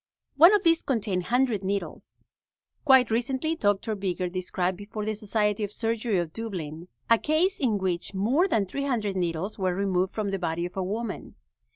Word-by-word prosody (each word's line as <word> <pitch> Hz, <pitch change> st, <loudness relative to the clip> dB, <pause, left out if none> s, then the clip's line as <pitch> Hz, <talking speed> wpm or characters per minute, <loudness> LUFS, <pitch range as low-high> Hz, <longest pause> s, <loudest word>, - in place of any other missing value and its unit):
One 335 Hz, +5 st, +8 dB
of 405 Hz, -, +1 dB
these 330 Hz, -1 st, +4 dB
contained 205 Hz, -8 st, -1 dB
100 245 Hz, -4 st, +1 dB
needles. 200 Hz, +1 st, -4 dB, 0.6 s
Quite 265 Hz, -4 st, +6 dB
recently 260 Hz, +7 st, 0 dB
Doctor 205 Hz, -3 st, 0 dB
Bigger 185 Hz, -3 st, -2 dB
described 185 Hz, 0 st, -2 dB
before 205 Hz, +2 st, -6 dB
the 215 Hz, -, -1 dB
Society 210 Hz, 0 st, 0 dB
of 205 Hz, -, -3 dB
Surgery 225 Hz, -1 st, -1 dB
of 170 Hz, -3 st, -2 dB
Dublin 175 Hz, -7 st, -6 dB, 0.2 s
a 230 Hz, -1 st, +5 dB
case 335 Hz, +6 st, +1 dB
in 235 Hz, -7 st, +1 dB
which 185 Hz, 0 st, -1 dB
more 255 Hz, -, +2 dB
than 215 Hz, -, +1 dB
300 225 Hz, -3 st, -2 dB
needles 180 Hz, +3 st, -2 dB
were 185 Hz, -2 st, 0 dB
removed 190 Hz, -1 st, 0 dB
from 210 Hz, -2 st, -1 dB
the 195 Hz, -, -2 dB
body 170 Hz, -1 st, -2 dB
of 180 Hz, -, -7 dB
a 190 Hz, -, -1 dB
woman. 215 Hz, +5 st, -4 dB
205 Hz, 175 wpm, -26 LUFS, 185-235 Hz, 0.6 s, One